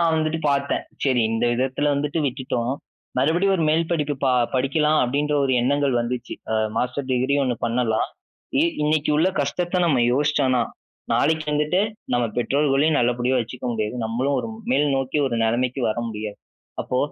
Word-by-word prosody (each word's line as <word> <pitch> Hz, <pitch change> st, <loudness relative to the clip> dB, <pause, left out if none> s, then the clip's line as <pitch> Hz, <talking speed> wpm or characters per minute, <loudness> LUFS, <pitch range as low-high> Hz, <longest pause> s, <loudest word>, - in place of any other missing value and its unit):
நான் 165 Hz, -1 st, +3 dB
வந்துட்டு 160 Hz, 0 st, 0 dB
பார்த்தேன். 140 Hz, 0 st, 0 dB, 0.2 s
சரி 130 Hz, -3 st, +2 dB
இந்த 115 Hz, +1 st, 0 dB
விதத்தில 130 Hz, +4 st, 0 dB
வந்துட்டு 145 Hz, +3 st, -1 dB
விட்டுட்டோம். 130 Hz, -2 st, -2 dB, 0.5 s
மறுபடியும் 170 Hz, +9 st, +2 dB
ஒரு 165 Hz, -, 0 dB
மேல் 165 Hz, +1 st, +1 dB
படிப்பு 150 Hz, -3 st, 0 dB
ப -, -, +3 dB, 0.3 s
படிக்கலாம் 150 Hz, +4 st, +2 dB
அப்படின்ற 145 Hz, +4 st, 0 dB
ஒரு 135 Hz, -, +1 dB
எண்ணங்கள் 140 Hz, +2 st, +1 dB
வந்துச்சு. 120 Hz, 0 st, -4 dB, 0.2 s
அ -, -, +1 dB, 0.2 s
மாஸ்டர் 130 Hz, +3 st, -2 dB
டிகிரி 130 Hz, +2 st, +1 dB
1 130 Hz, -2 st, 0 dB
பண்ணலாம். 115 Hz, -1 st, 0 dB, 0.7 s
இன்னைக்கு 150 Hz, 0 st, +1 dB
உள்ள 165 Hz, +5 st, +3 dB
கஷ்டத்தை 175 Hz, +6 st, -1 dB
நாம் 155 Hz, -7 st, +3 dB
யோசிச்சோம்ன்னா, 135 Hz, -3 st, +2 dB, 0.5 s
நாளைக்கு 155 Hz, 0 st, +2 dB
வந்துட்டு 150 Hz, +5 st, +1 dB, 0.3 s
நம்ம 120 Hz, 0 st, +2 dB
பெற்றோர்களையும் 140 Hz, +4 st, +2 dB
நல்லபடியா 125 Hz, +2 st, +1 dB
வச்சுக்க 120 Hz, +2 st, -7 dB
முடியாது. 110 Hz, +1 st, -2 dB
நம்மளும் 125 Hz, +5 st, 0 dB
ஒரு -, -, -5 dB, 0.2 s
மேல்நோக்கி 135 Hz, -, +1 dB
ஒரு 120 Hz, -3 st, -1 dB
நிலைமைக்கு 125 Hz, +4 st, 0 dB
வர 110 Hz, -, -1 dB
முடியாது. 105 Hz, -1 st, -6 dB, 0.4 s
அப்போ 125 Hz, -, -2 dB
135 Hz, 150 wpm, -23 LUFS, 125-150 Hz, 0.7 s, நான்